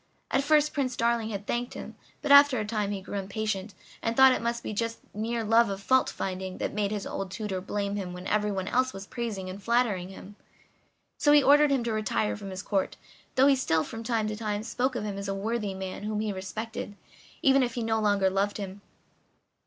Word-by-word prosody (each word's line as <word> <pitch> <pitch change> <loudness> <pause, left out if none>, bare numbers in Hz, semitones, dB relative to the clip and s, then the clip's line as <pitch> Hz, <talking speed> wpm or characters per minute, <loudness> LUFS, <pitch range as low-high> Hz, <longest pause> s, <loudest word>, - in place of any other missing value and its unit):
At 270 - +2
first 300 +1 +3
Prince 260 -4 -1
Darling 235 -1 +1
had 200 -2 -5
thanked 240 +2 -2
him, - - -8 0.3
but 290 - 0
after 280 -3 +8
a 210 - -2
time 210 -1 -1
he 200 -2 -4
grew 200 - -4
impatient 200 0 -3 0.3
and 230 0 -1
thought 265 0 +9
it - - 0
must 235 0 -2
be - - -4
just 230 +2 -2 0.2
mere 225 +2 -2
love 225 +1 +4
of 195 -1 -3
fault 260 +6 +3
finding 185 0 -4
that - - -3
made 205 -1 0
his 205 -1 -3
old 195 -1 -4
tutor 190 -1 -4
blame 200 +1 -2
him 185 -3 -4
when 180 +1 -8
everyone 205 -3 0
else 255 +3 +1
was 195 0 -7
praising 215 -5 -4
and 185 +2 -7
flattering 220 -5 +1
him. 195 +1 -11 0.8
So 290 - +5
he 295 -1 +7
ordered 295 +2 +6
him 270 -3 +1
to 230 -1 -1
retire 110 - 0
from 195 - -8
his 185 0 -6
Court, 195 -2 -1 0.4
though 260 - +5
he 280 -1 +6
still, 160 -12 +1
from 225 - -7
time 225 -2 0
to 215 - -3
time, 210 -1 -3
spoke 255 +3 -1
of 235 - -2
him 200 -2 -4
as 200 - -5
a 195 - -2
worthy 210 -1 -2
man 190 0 -5
whom 210 0 -2
he 215 -2 -1
respected, 205 +2 -5 0.5
even 270 0 +5
if 245 -2 -1
he 240 - -2
no 225 0 +1
longer 205 -3 +2
loved 200 +2 0
him. 200 -1 -6
215 Hz, 225 wpm, -28 LUFS, 195-235 Hz, 0.8 s, thought